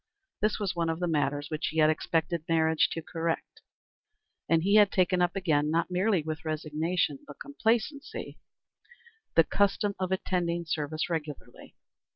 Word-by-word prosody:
This 215 0 +1
was 195 -4 -2
one 170 -1 0
of 165 0 -2
the 175 - 0
matters 145 -2 -1
which 155 +1 -2
he 160 - -4
had 155 0 +5
expected 160 +1 -1
marriage 160 -1 +3
to 165 - -5
correct, 165 0 -3 0.9
and 165 -1 +3
he 200 +2 +2
had 210 -2 +6
taken 185 -1 +2
up 175 +1 +1
again, 155 -6 +1
not 165 +3 0
merely 185 -1 +2
with 155 0 -5
resignation 155 0 -1
but 145 - -11
complacency, 270 +1 -2 1.0
the 165 - +7
custom 200 +3 +1
of 185 -1 -2
attending 175 -2 -1
service 155 -1 -2
regularly. 155 -4 -6
165 Hz, 155 wpm, -29 LUFS, 155-185 Hz, 1.0 s, the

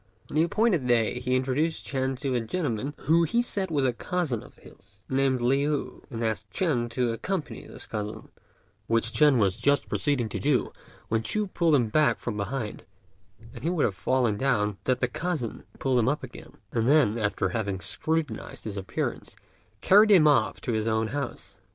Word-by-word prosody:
On - - -6
the 155 - +4
appointed 175 - +2
day 120 0 +2
he 125 +1 0
introduced 135 +5 0
Ch'ên 130 -1 -1
to 135 -3 -1
a 120 - +1
gentleman 140 0 -2
who 160 +4 +4
he 170 +8 +1
said 200 -6 -1
was 145 -4 +1
a 125 - +2
cousin 155 -3 -2
of - - -15
his, 100 0 -18
named 130 -1 +1
Liu, 140 +4 0
and 115 -3 -4
asked 110 -2 -2
Ch'ên 120 - 0
to 120 0 0
accompany 160 - -4
this - - -8
cousin, 105 0 -5 0.6
which 115 0 +2
Ch'ên 150 -1 +4
was 100 0 +1
just 140 +3 +2
proceeding 140 -6 0
to - - -4
do 140 -3 +1 0.4
when 110 0 +1
Ch'u 210 - 0
pulled 170 -5 +2
him 120 -5 +2
back 150 +6 +3
from 120 - -4
behind, 105 +2 -4 0.7
and - - -10
he 165 - +1
would 175 -4 +1
have 100 - 0
fallen 115 +3 +1
down 105 -6 +1
but 100 - -19
that 130 -1 +1
the 125 - +2
cousin 155 -4 -4
pulled 130 -2 +1
him 115 - +2
up 145 0 -2
again, 125 - -10 0.2
and 115 +1 +1
then, 135 -7 +4
after 100 -3 0
having 100 -2 -2
scrutinized 155 - -3
his 105 -2 -5
appearance, 95 -1 -4 0.5
carried 210 +3 +6
him 180 -7 +7
off 145 - +3
to 125 - -2
his 110 0 -1
own 110 0 +1
house. 140 +1 -5
130 Hz, 190 wpm, -27 LUFS, 110-150 Hz, 0.7 s, him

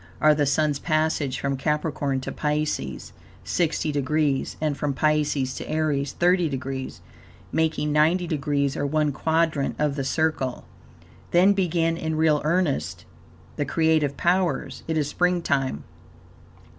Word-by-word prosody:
are 155 0 +5
the 145 -1 +1
Sun's 145 0 +1
passage 155 -4 0
from 140 -1 -1
Capricorn 145 -1 -1
to - - -5
Pisces, 150 - -2 0.3
60 160 -2 0
degrees, 145 0 0
and 155 -2 0
from 140 0 -2
Pisces 150 -3 +1
to - - -7
Aries, 150 -3 0
30 175 -1 +2
degrees, 135 -1 -5 0.5
making 160 -2 0
90 160 +4 +3
degrees, 140 -3 -1
or - - -2
one 150 0 +1
quadrant 160 0 0
of 150 -2 0
the 140 - -2
circle. 135 -2 -1 0.6
Then 185 +3 +5
begin 170 -3 0
in 160 -1 -2
real 155 -1 +3
earnest 145 - 0 0.5
the 145 - 0
creative 155 -2 +1
powers, 180 0 0
it 160 -1 -1
is 150 -2 +1
spring 180 +3 +1
time. 135 - -1
150 Hz, 135 wpm, -24 LUFS, 140-160 Hz, 0.6 s, are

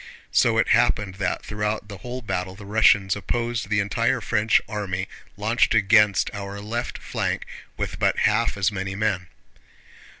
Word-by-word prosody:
So - - +3
it - - +2
happened 100 -2 +2
that 90 - -1
throughout 105 0 -3
the 100 -2 -9
whole 125 +1 -6
battle 95 -3 -3
the 100 0 -11
Russians 100 -2 +4
opposed 115 +1 -2
the 105 0 +2
entire 100 -2 +1
French 105 +2 +2
army 100 -3 -3 0.3
launched 110 +3 +2
against 105 -1 +4
our 100 0 -6
left 115 +4 -4
flank - - -3 0.3
with - - -4
but - - +2
half 115 0 +1
as 100 +1 +2
many 95 -1 -4
men. 100 -4 -1
105 Hz, 155 wpm, -24 LUFS, 95-110 Hz, 0.3 s, Russians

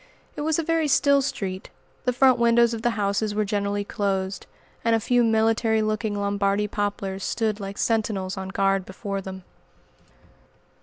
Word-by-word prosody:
It - - -5
was 310 +1 +1
a 330 - 0
very 325 -1 +1
still 280 0 +4
street; 190 -8 -4 0.4
the 250 - +3
front 255 0 +4
windows 235 0 +4
of 225 - -4
the 240 - +2
houses 205 +1 0
were 215 0 +1
generally 205 0 -1
closed, 195 -1 -2 0.4
and 230 0 +3
a - - +2
few 245 +2 +2
military 225 0 +2
looking 215 0 -1
Lombardy 200 0 0
poplars 200 -2 -3
stood 220 -2 -1
like 195 0 -6
sentinels 210 -4 -1
on 190 -1 -5
guard 195 0 +1
before 195 +1 -5
them. 190 -1 -8
210 Hz, 160 wpm, -24 LUFS, 195-230 Hz, 0.4 s, still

